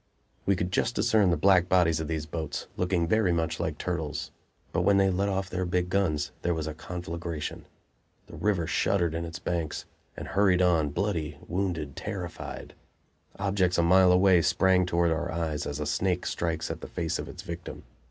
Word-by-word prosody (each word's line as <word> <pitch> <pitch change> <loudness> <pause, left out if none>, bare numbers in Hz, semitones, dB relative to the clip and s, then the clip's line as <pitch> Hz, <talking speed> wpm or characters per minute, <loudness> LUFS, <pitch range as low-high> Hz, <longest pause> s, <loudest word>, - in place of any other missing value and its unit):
We 100 - +4
could 90 0 -2
just 115 +5 0
discern 110 -4 +3
the 85 - +2
black 95 -2 +4
bodies 85 -4 +3
of 80 - -3
these 80 -1 -2
boats, 80 0 -4
looking 90 -2 0
very 110 -1 +3
much 80 -1 -1
like - - -2
turtles. 80 -4 -3 0.4
But - - +1
when 100 -1 +4
they 95 -1 +4
let 100 +2 0
off 95 0 -1
their 95 0 -2
big 90 0 0
guns 80 -7 +1
there 85 -1 0
was 80 -1 -3
a 80 - -4
conflagration. 85 -1 -5 0.6
The - - -12
river 100 -5 0
shuddered 85 -1 +1
in 85 +1 -2
its 85 -1 -6
banks, 85 -3 -3 0.3
and - - -6
hurried 95 -2 +3
on, 80 -4 +3
bloody, 80 -2 -2
wounded, 85 -6 -2
terrified! 95 -4 -6 0.6
Objects 95 -2 +1
a 85 - +3
mile 90 +1 +6
away 90 -1 +5
sprang 95 +1 +3
toward 85 -1 +2
our 85 +2 -1
eyes 80 -2 -2
as 75 0 -4
a 75 - -2
snake 90 +4 0
strikes 80 -2 -2
at - - -6
the - - -7
face 85 -2 -2
of - - -5
its - - -9
victim. 85 0 -7
90 Hz, 190 wpm, -28 LUFS, 80-95 Hz, 0.6 s, mile